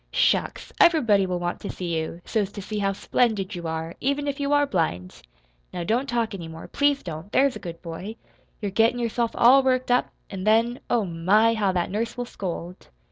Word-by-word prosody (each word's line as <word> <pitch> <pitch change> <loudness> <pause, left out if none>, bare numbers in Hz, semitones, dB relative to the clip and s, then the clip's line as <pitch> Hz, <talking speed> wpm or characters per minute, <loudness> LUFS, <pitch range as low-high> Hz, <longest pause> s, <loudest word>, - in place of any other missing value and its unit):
"Shucks! - - 0
Everybody 225 - +4
will 180 -1 -1
want 175 0 -3
to - - -6
see 175 -2 -3
you, 160 +2 -4
so's 205 -3 -1
to 205 - -6
see 210 +1 -4
how 195 -1 +1
splendid 210 -1 0
you 170 -2 -5
are, 160 +1 -4
even 280 +2 0
if 280 0 -3
you 280 0 -1
are 290 0 +4
blind. 160 - -2 0.5
Now 175 - -4
don't 240 +9 0
talk 235 -3 0
any 175 -4 -6
more 160 0 -9
please 285 -1 +1
don't; 165 +3 -7
there's 275 -1 +3
a - - -6
good 170 -2 -8
boy. 180 +6 -6 0.5
You're 200 - -1
gettin' 225 +4 +3
yourself 235 0 0
all 260 +3 +7
worked 255 -1 +1
up, 245 - +2 0.2
an' 190 -2 -5
then, 230 +4 +2
oh, 230 -4 +2
my, 190 +7 +3
how 205 -4 +1
that 175 -1 -1
nurse 225 +4 -2
will 245 - -2
scold!" 180 -4 -6
210 Hz, 205 wpm, -25 LUFS, 175-245 Hz, 0.5 s, all